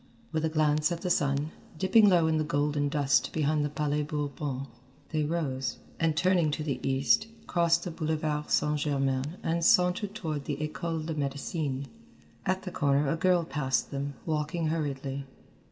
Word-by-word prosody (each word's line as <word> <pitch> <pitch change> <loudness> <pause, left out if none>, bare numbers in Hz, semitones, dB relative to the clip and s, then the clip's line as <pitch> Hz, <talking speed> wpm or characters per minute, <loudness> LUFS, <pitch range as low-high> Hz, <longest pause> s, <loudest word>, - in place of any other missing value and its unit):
With 160 -1 -1
a 160 - +2
glance 155 0 +2
at 170 0 -3
the 180 - -1
sun, 145 +1 +1 0.3
dipping 205 +4 +5
low 175 -3 +4
in 160 -1 +2
the - - +1
golden 145 -1 0
dust 140 -2 +2
behind 155 -1 +1
the 145 - 0
Palais 150 0 0
Bourbon, 145 -2 -3 0.4
they 155 -2 0
rose, 135 -6 -2 0.2
and 160 -2 +1
turning 180 -3 +3
to 155 - -2
the 140 -4 -2
east, 135 +11 +2 0.2
crossed 170 -1 +2
the 175 - -4
Boulevard 155 -2 -2
St. 150 0 +2
Germain 140 +2 0
and 165 +1 0
sauntered 180 +4 +3
toward 155 -8 -3
the 145 - -2
École 155 +1 -3
de 160 - -2
Médecine. 140 -1 -2 0.6
At 185 +1 0
the 185 - -5
corner 140 -2 +2
a - - +1
girl 175 +1 +3
passed 140 -5 -1
them, 140 0 -3
walking 155 +1 -1
hurriedly. 140 -3 -3
150 Hz, 170 wpm, -29 LUFS, 145-165 Hz, 0.6 s, dipping